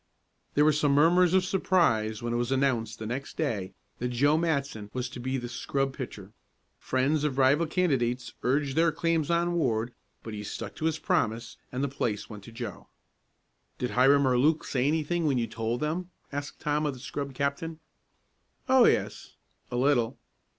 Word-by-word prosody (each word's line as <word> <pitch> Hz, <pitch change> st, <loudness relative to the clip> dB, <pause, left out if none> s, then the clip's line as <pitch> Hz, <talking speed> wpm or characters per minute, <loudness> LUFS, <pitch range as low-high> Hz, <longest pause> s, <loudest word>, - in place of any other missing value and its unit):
There 150 Hz, -, +5 dB
were 155 Hz, -, +5 dB
some 145 Hz, -1 st, +2 dB
murmurs 175 Hz, +5 st, +5 dB
of 185 Hz, -1 st, +3 dB
surprise 120 Hz, -, +1 dB
when 120 Hz, 0 st, -1 dB
it -, -, +1 dB
was 120 Hz, +1 st, -1 dB
announced 120 Hz, -5 st, +1 dB
the 110 Hz, -, -6 dB
next 125 Hz, +5 st, -5 dB
day 100 Hz, -11 st, -2 dB, 0.2 s
that 125 Hz, -, -1 dB
Joe 140 Hz, +5 st, +3 dB
Matson 140 Hz, -10 st, -1 dB
was 125 Hz, -1 st, -2 dB
to -, -, -9 dB
be 130 Hz, +2 st, -2 dB
the 120 Hz, -1 st, -4 dB
scrub 135 Hz, +3 st, -2 dB
pitcher. 110 Hz, -7 st, -8 dB, 0.5 s
Friends 140 Hz, +4 st, +1 dB
of 145 Hz, -3 st, -1 dB
rival 140 Hz, +5 st, +4 dB
candidates 125 Hz, -8 st, 0 dB
urged 135 Hz, +2 st, 0 dB
their 165 Hz, +1 st, +4 dB
claims 165 Hz, -1 st, 0 dB
on 170 Hz, +1 st, +2 dB
Ward, 120 Hz, -7 st, 0 dB, 0.3 s
but 110 Hz, -, -7 dB
he 105 Hz, -1 st, -5 dB
stuck -, -, -6 dB
to 155 Hz, -, -3 dB
his 160 Hz, -1 st, +1 dB
promise 115 Hz, -3 st, -1 dB
and 125 Hz, +2 st, -2 dB
the -, -, +2 dB
place 120 Hz, -6 st, -3 dB
went 105 Hz, -2 st, -9 dB
to -, -, -11 dB
Joe. 120 Hz, +1 st, -7 dB, 0.9 s
"Did 125 Hz, -, -2 dB
Hiram 140 Hz, +3 st, +5 dB
or 125 Hz, -1 st, +3 dB
Luke 155 Hz, +4 st, +3 dB
say 130 Hz, 0 st, 0 dB
anything 160 Hz, +2 st, 0 dB
when 135 Hz, -3 st, +2 dB
you 120 Hz, -, +1 dB
told 115 Hz, +1 st, -3 dB
them?" 170 Hz, +4 st, -2 dB, 0.2 s
asked 145 Hz, +1 st, -5 dB
Tom 150 Hz, 0 st, 0 dB
of 140 Hz, -, -2 dB
the -, -, -11 dB
scrub 140 Hz, +1 st, -5 dB
captain. 140 Hz, +4 st, -2 dB, 0.9 s
"Oh, 260 Hz, -2 st, +6 dB
yes -, -, 0 dB, 0.3 s
a -, -, -4 dB
little." 125 Hz, -2 st, +2 dB
135 Hz, 185 wpm, -28 LUFS, 120-155 Hz, 0.9 s, Oh